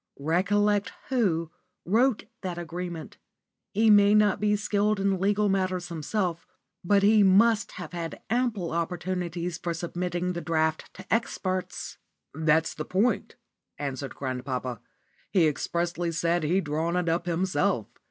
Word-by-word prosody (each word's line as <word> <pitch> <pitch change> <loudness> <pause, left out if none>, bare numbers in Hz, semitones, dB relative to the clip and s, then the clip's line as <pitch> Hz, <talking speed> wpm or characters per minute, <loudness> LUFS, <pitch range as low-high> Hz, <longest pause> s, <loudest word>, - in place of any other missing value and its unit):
Recollect 200 +7 +1 0.2
Who 175 - +1 0.3
wrote 230 +5 +2 0.2
that 180 -3 -4
agreement. 175 -1 -6 0.5
He 220 +1 +4
may 205 0 +6
not 210 -2 +4
be 210 0 +2
skilled 205 0 +1
in 195 -1 +1
legal 205 +2 +2
matters 185 -2 0
himself, 170 +1 -2 0.4
but 200 +2 +3
he 210 +1 +6
must 205 +3 +4
have 180 -2 -8
had 170 -2 -5
ample 230 -7 0
opportunities 175 0 -3
for 170 -1 -3
submitting 175 +1 -2
the 170 - -4
draft 160 -1 0
to - - -5
experts." 185 -5 -2 0.3
"That's 160 +1 +2
the 155 - -5
point," 195 +9 0 0.4
answered 140 -1 -4
grandpapa. 130 -2 -4 0.5
"He 180 -4 +4
expressly 170 +3 -1
said 170 +2 +1
he'd 175 +5 +1
drawn 160 +3 -1
it 180 -1 0
up 170 +1 0
himself. 165 - +1
180 Hz, 135 wpm, -27 LUFS, 165-200 Hz, 0.5 s, may